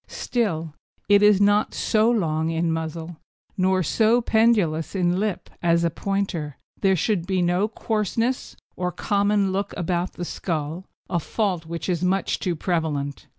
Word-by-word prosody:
Still, 165 - -2 0.4
though 205 +1 +7
not 205 +1 +3
so 220 +1 +2
long 160 -8 0
in 165 0 0
muzzle 160 +1 -4 0.4
nor 185 0 +2
so 220 +8 +3
pendulous 220 -9 +2
in 180 -1 +1
lip 210 -2 -2
as 170 -1 +3
a 170 - +1
Pointer, 180 -6 -3 0.2
there 195 -1 +3
should 180 0 0
be 190 -1 0
no 180 +4 +2
coarseness 225 +3 -2 0.2
or 180 0 -2
common 200 0 +1
look 195 +1 -2
about 175 0 -1
the 175 - -5
skull, 165 +1 -4 0.2
a 175 - 0
fault 180 -2 -2
which 165 -1 -5
is 180 -2 -1
much 190 +2 0
too 180 -3 -1
prevalent. 155 -4 -2
180 Hz, 150 wpm, -24 LUFS, 165-205 Hz, 0.4 s, though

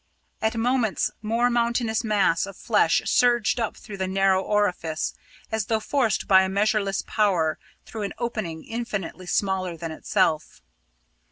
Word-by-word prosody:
At 220 +1 0
moments 235 -2 +1
some 230 +3 +1
mountainous 235 -1 +1
mass 200 -5 +2
of 195 - -10
flesh 210 -7 +2
surged 240 -1 +3
up 230 - -2
through 200 - -9
the 190 -1 -2
narrow 190 0 +2
orifice, 185 -6 -1 0.4
as 220 -2 -1
though 220 -1 +1
forced 235 -1 0
by 190 -1 +7
a 190 - 0
measureless 200 0 +1
power 180 -7 +1 0.3
through 220 - -7
an 200 - -3
opening 215 -9 -4
infinitely 200 -6 -5
smaller 185 -3 -1
than 165 -1 -5
itself. 160 - -1
205 Hz, 145 wpm, -25 LUFS, 190-225 Hz, 0.4 s, by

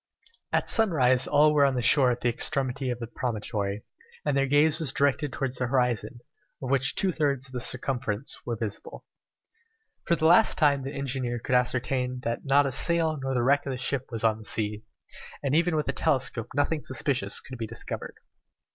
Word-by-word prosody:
At - - +1
sunrise 135 - +2
all 150 +1 +4
were 145 -1 +4
on 135 -2 +3
the 125 - 0
shore 130 +1 +5
at 120 0 -2
the - - 0
extremity 130 +2 -1
of 120 - -2
the 120 - -5
promontory, 105 -3 -3 0.4
and 145 -2 +1
their 135 0 +2
gaze 150 +3 +3
was 155 -5 -1
directed 140 0 +1
towards 130 -1 -3
the 125 - -1
horizon, 120 -2 -1 0.4
of 130 -1 -4
which 135 -1 +2
two 190 - +2
thirds 140 -5 -1
of 130 - -12
the 125 - -3
circumference 125 -1 -2
were 120 - -3
visible. 110 -2 -6 1.0
For 170 - +2
the 160 - -2
last 170 +2 +5
time 145 -3 +3
the 135 +1 -5
engineer 130 -3 -2
could 120 - -4
ascertain 125 0 0
that 115 -1 -3
not 140 0 +4
a 135 - -1
sail 160 +2 +1
nor 135 0 -2
the 120 - +1
wreck 140 +3 +2
of 135 - -2
a - - -4
ship 130 +1 -2
was 115 -3 -5
on 110 -1 +2
the - - -11
sea, 105 -1 -2 0.6
and 140 -1 0
even 170 +1 +2
with 150 - 0
the 135 - -2
telescope 130 -5 -1
nothing 150 +2 0
suspicious 130 0 -1
could 130 -2 -10
be 110 - -3
discovered. 115 +1 -6
130 Hz, 200 wpm, -27 LUFS, 120-145 Hz, 1.0 s, shore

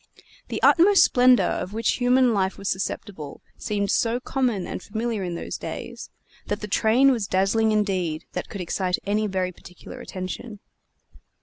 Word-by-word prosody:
The - - -4
utmost 385 +4 +6
splendor 250 0 +5
of 185 +2 -2
which 225 0 0
human 250 -1 +3
life 190 -2 0
was 200 - -6
susceptible 190 -5 -4 0.2
seemed 200 -2 -2
so 235 +1 +1
common 250 -7 -1
and - - -6
familiar 220 0 -3
in 175 -2 -4
those - - -5
days, - - -7 0.4
that 205 +1 -3
the 210 - -4
train 235 +7 +4
was 225 -6 -1
dazzling 200 +4 +2
indeed 185 -7 -1
that - - -4
could 200 - -6
excite 180 +1 -1
any 210 +2 0
very 185 -2 -1
particular 180 0 -12
attention. 195 +4 -7
205 Hz, 160 wpm, -24 LUFS, 190-235 Hz, 0.4 s, utmost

